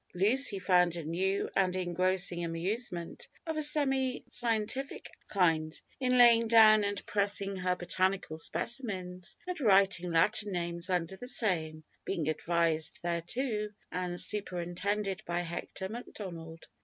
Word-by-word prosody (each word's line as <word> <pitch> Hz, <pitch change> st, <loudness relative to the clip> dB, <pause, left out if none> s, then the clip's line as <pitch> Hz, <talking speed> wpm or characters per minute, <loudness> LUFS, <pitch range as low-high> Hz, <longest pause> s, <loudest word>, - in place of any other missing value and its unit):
Lucy 210 Hz, +5 st, +5 dB
found 180 Hz, -2 st, +2 dB
a 170 Hz, -, -5 dB
new 185 Hz, +5 st, -1 dB
and 185 Hz, -2 st, +1 dB
engrossing 180 Hz, 0 st, 0 dB
amusement, 170 Hz, +2 st, -4 dB, 0.2 s
of 320 Hz, -1 st, -3 dB
a 310 Hz, -, -1 dB
semi 270 Hz, -4 st, +3 dB
scientific 235 Hz, +3 st, -2 dB, 0.2 s
kind, 160 Hz, -5 st, 0 dB, 0.2 s
in 250 Hz, -1 st, +1 dB
laying 235 Hz, -2 st, +6 dB
down 220 Hz, -2 st, +6 dB
and 200 Hz, 0 st, -3 dB
pressing 200 Hz, -1 st, -1 dB
her 185 Hz, -1 st, -1 dB
botanical 185 Hz, -1 st, -1 dB
specimens, 185 Hz, -1 st, -3 dB
and 360 Hz, -3 st, -5 dB
writing 195 Hz, -5 st, +3 dB
Latin 205 Hz, +5 st, +2 dB
names 170 Hz, 0 st, -2 dB
under 180 Hz, 0 st, -1 dB
the 245 Hz, -, -9 dB
same, 160 Hz, -10 st, -1 dB, 0.2 s
being 165 Hz, -6 st, -3 dB
advised 160 Hz, 0 st, 0 dB
thereto 210 Hz, +6 st, -2 dB, 0.2 s
and 180 Hz, -1 st, -3 dB
superintended 195 Hz, +1 st, -2 dB
by 175 Hz, 0 st, -1 dB
Hector 175 Hz, +2 st, -6 dB
Macdonald. 175 Hz, -7 st, -9 dB
190 Hz, 125 wpm, -30 LUFS, 175-215 Hz, 0.2 s, laying